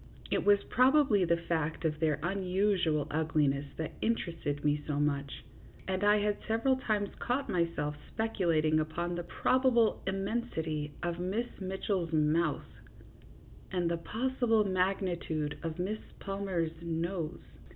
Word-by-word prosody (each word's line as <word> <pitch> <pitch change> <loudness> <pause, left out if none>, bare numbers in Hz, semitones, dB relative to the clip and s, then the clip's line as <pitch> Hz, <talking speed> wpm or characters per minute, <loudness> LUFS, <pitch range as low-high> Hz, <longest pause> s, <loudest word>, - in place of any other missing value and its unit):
It - - +1
was 205 0 +5
probably 255 -6 +4
the 170 0 +3
fact 165 -1 -2
of 155 -1 0
their 155 -3 +2
unusual 185 -4 +1
ugliness 150 -2 +1
that 160 -2 -3
interested 165 -10 -1
me 150 0 +2
so 145 -1 -1
much, 140 -2 -1 0.4
and 190 +1 -1
I 205 +1 +5
had 205 0 0
several 230 +4 +2
times 210 -5 -1
caught 260 +3 -1
myself 165 -4 0 0.2
speculating 170 -8 +1
upon 170 +3 -2
the 175 - -2
probable 240 +4 +2
immensity 190 -7 -2
of 175 0 -2
Miss 200 +7 -1
Mitchell's 190 -2 -2
mouth 155 +1 +2 1.1
and 175 -3 0
the 170 - 0
possible 225 +3 +1
magnitude 180 -5 -1
of 165 -1 -4
Miss 200 +4 -2 0.2
Palmer's 185 -5 -2
nose. 170 0 -3
175 Hz, 130 wpm, -31 LUFS, 160-205 Hz, 1.1 s, was